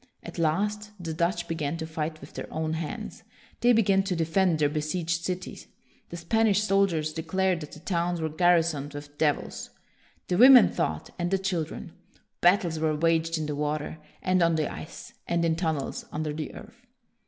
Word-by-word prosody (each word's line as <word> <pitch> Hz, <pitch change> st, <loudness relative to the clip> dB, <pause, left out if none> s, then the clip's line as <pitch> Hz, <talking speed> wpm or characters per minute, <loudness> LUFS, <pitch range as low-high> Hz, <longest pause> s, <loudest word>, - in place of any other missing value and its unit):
At -, -, -8 dB
last, 205 Hz, +6 st, 0 dB
the 165 Hz, -2 st, -4 dB
Dutch 170 Hz, +1 st, -1 dB
began 160 Hz, -1 st, -2 dB
to 160 Hz, -, -4 dB
fight 160 Hz, 0 st, -4 dB
with 140 Hz, -, -12 dB
their -, -, -7 dB
own 160 Hz, 0 st, -2 dB
hands. 160 Hz, -1 st, -5 dB, 0.4 s
They 245 Hz, -, +4 dB
began 200 Hz, -4 st, +4 dB
to 185 Hz, -, -1 dB
defend 165 Hz, +1 st, +2 dB
their 150 Hz, -1 st, +3 dB
besieged 160 Hz, +3 st, -2 dB
cities. 180 Hz, 0 st, -5 dB, 0.4 s
The 170 Hz, -, -6 dB
Spanish 210 Hz, +3 st, +2 dB
soldiers 195 Hz, -7 st, +1 dB
de 160 Hz, -, -3 dB
clared 185 Hz, +2 st, 0 dB
that 150 Hz, -2 st, -9 dB
the 155 Hz, -, -11 dB
towns 175 Hz, -1 st, -1 dB
were 160 Hz, -, -1 dB
garrisoned 160 Hz, -3 st, +2 dB
with 145 Hz, 0 st, -9 dB
devils. 150 Hz, -2 st, -1 dB, 0.6 s
The 180 Hz, -, 0 dB
women 255 Hz, -1 st, +9 dB
fought, 75 Hz, 0 st, -3 dB
and 175 Hz, 0 st, 0 dB
the 195 Hz, -, +2 dB
chil 185 Hz, -4 st, -1 dB
dren. -, -, -9 dB, 0.5 s
Battles 175 Hz, -3 st, +3 dB
were 155 Hz, -1 st, +1 dB
waged 165 Hz, +1 st, +1 dB
in 155 Hz, -, -2 dB
the 150 Hz, -, -3 dB
water, 150 Hz, +1 st, -3 dB, 0.2 s
and 185 Hz, -1 st, +2 dB
on 170 Hz, -1 st, +3 dB
the 155 Hz, -2 st, -1 dB
ice, 155 Hz, -, -9 dB
and 170 Hz, 0 st, +1 dB
in 165 Hz, -1 st, +2 dB
tunnels 160 Hz, -5 st, -2 dB
under 155 Hz, 0 st, -3 dB
the 155 Hz, 0 st, -5 dB
earth. 240 Hz, +1 st, -13 dB
165 Hz, 185 wpm, -27 LUFS, 155-185 Hz, 0.6 s, women